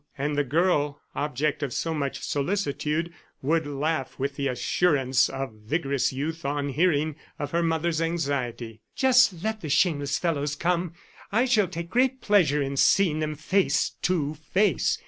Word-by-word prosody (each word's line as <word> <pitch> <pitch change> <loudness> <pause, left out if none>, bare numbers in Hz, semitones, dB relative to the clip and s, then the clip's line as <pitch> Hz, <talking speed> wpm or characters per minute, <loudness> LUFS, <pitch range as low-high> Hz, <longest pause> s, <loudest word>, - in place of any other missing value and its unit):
And 145 +2 -1
the 145 - +2
girl, 150 0 +1
object 145 +1 -1
of 140 -3 -2
so 165 - -1
much 140 -3 -3
solicitude, 160 0 -1 0.3
would 160 +2 +1
laugh 145 -1 -2
with 140 +1 -2
the 140 0 -1
assurance 135 0 +2
of 135 -4 -5
vigorous 135 +5 -1
youth 160 +5 -4
on 145 0 -1
hearing 155 0 +1 0.2
of 145 -1 -4
her 170 - +1
mother's 165 0 0
anxiety. 135 -9 -2
"Just 250 -10 +4
let 220 0 -2
the 155 - -5
shameless 145 -3 +2
fellows 145 -4 -1
come! 175 +1 -1 0.4
I 225 +5 +3
shall 215 -6 +3
take 170 0 -6
great 260 +1 +2
pleasure 170 - +3
in 135 0 -4
seeing 170 0 +4
them 155 -1 -2
face 185 +6 +1
to 155 -5 0
face!" 185 +7 +1
155 Hz, 155 wpm, -26 LUFS, 140-175 Hz, 0.4 s, Just